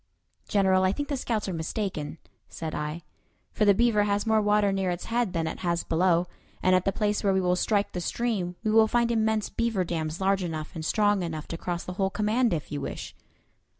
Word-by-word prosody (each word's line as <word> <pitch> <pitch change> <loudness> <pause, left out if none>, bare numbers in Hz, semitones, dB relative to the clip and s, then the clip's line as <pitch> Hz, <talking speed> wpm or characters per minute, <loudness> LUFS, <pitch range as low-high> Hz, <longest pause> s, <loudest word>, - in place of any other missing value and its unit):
"General, 190 -2 +3
I 185 +1 +3
think 290 +5 -4
the 285 - 0
scouts 230 -5 -2
are 190 - -2
mistaken," 165 -2 -3 0.3
said 160 -2 -5
I, 150 +3 -4 0.5
"for 210 - +1
the 200 -1 +6
Beaver 220 -2 +3
has 205 +1 0
more 220 -1 +3
water 210 -1 +3
near 195 -1 0
its 175 0 -3
head 230 -4 0
than 165 -2 0
it - - -4
has 170 -1 -1
below; 175 +1 +2 0.4
and 185 - +4
at 185 - +1
the 195 - +2
place 210 0 0
where 195 -1 +3
we - - +3
will 180 -1 +2
strike 205 +2 +1
the 180 - -4
stream 195 -4 -2
we 215 - +1
will 220 0 +6
find 235 +1 +2
immense 220 -2 +1
beaver 230 -5 0
dams, 160 -2 -3
large 195 0 +2
enough 155 -3 -4
and 160 - -6
strong 205 +3 +2
enough 160 -3 -4
to - - -3
cross 175 0 -3
the 180 - -6
whole 190 - +2
command, 215 +4 +1
if 155 -3 -3
you 145 -1 -3
wish." - - -6
195 Hz, 220 wpm, -27 LUFS, 170-215 Hz, 0.5 s, the